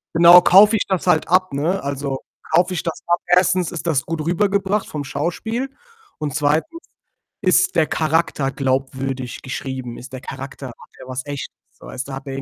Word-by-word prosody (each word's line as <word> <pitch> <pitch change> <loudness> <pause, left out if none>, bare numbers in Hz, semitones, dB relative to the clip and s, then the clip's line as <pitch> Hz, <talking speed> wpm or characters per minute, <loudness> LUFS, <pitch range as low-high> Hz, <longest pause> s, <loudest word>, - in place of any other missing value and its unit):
Genau, 170 +2 +9
kaufe 205 +5 +7
ich 210 - 0
das 190 -5 -1
halt 160 - +2
ab, 185 -3 +2
ne? 165 +7 0
Also, 140 -1 -3 0.3
kaufe 180 +2 +3
ich 175 - -3
das 165 - -4
ab? 175 0 +2
1., 180 0 +3
ist 170 -1 -6
das 145 -5 +1
gut 165 0 -4
rübergebracht, 200 +3 +1
vom 145 -2 -5
Schauspiel 220 - -3 0.5
und 150 -1 -4
2., 160 - 0 0.6
ist 185 0 +2
der 160 -3 +3
Charakter 155 -3 0
glaubwürdig 130 -1 -2
geschrieben? 130 -2 -6
Ist 130 +2 -11
der 130 -1 -7
Charakter 135 0 -8
hat 120 - -9 0.3
er - - -11
was 130 0 -5
Echtes, 145 -1 -6 0.2
so - - -17
weißt 130 +1 -6
du? - - -6
Hat 135 +1 -7
der 135 -1 -5
155 Hz, 185 wpm, -20 LUFS, 135-180 Hz, 0.6 s, Genau